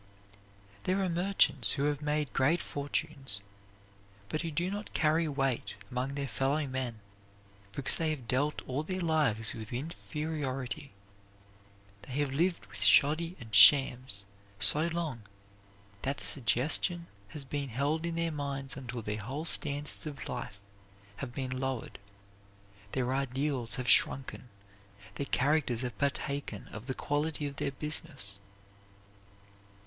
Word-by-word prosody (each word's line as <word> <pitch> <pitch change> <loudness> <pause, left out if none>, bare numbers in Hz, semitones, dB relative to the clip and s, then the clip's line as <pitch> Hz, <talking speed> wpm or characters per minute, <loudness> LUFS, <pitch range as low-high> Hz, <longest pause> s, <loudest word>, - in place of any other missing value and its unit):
There 185 +2 +2
are 185 - +1
merchants 175 -6 +3
who 140 - -1
have 145 0 +1
made 150 -1 0
great 145 +6 +3
fortunes, 140 -7 -2 0.9
but 155 - -1
who 165 - -2
do 175 +4 -1
not 205 +1 -6
carry 160 +1 +3
weight 135 -4 -1 0.2
among 130 +2 -2
their 140 -1 -2
fellow 135 +4 0
men 130 -4 -3 0.7
because 140 - +1
they 160 -1 +1
have 140 -7 -4
dealt 145 +5 0
all 130 +3 -1
their 185 +4 -3
lives 150 - +2
with 110 -1 -7
inferiority. 140 -2 -4 1.1
They 125 - -9
have 145 0 0
lived 170 -4 +1
with 100 -1 -9
shoddy 155 - +5
and 110 -3 -11
shams 125 -1 +7 0.4
so 150 - +5
long 165 -8 -2 0.8
that 140 +2 -1
the - - -9
suggestion 150 - +1 0.2
has 140 +7 -8
been 140 0 -3
held 145 +7 0
in 170 0 -2
their 165 0 0
minds 140 -2 -3
until 125 -3 -5
their 105 0 -3
whole 135 +10 -4
standards 145 -1 -1
of 140 -2 -6
life 100 - -5 0.6
have 120 +2 -5
been 130 0 -4
lowered; 130 -5 -3 0.9
their 130 -1 0
ideals 135 -2 -1
have 125 -2 -3
shrunken; 130 -1 +4 0.6
their 140 - -4
characters 135 -4 +2
have 125 -1 -4
partaken 140 -5 -2
of 110 +4 -8
the 130 - -2
quality 150 +1 -1
of 140 -1 -5
their 140 - -1
business. 140 -9 -4
140 Hz, 135 wpm, -31 LUFS, 125-155 Hz, 1.1 s, shams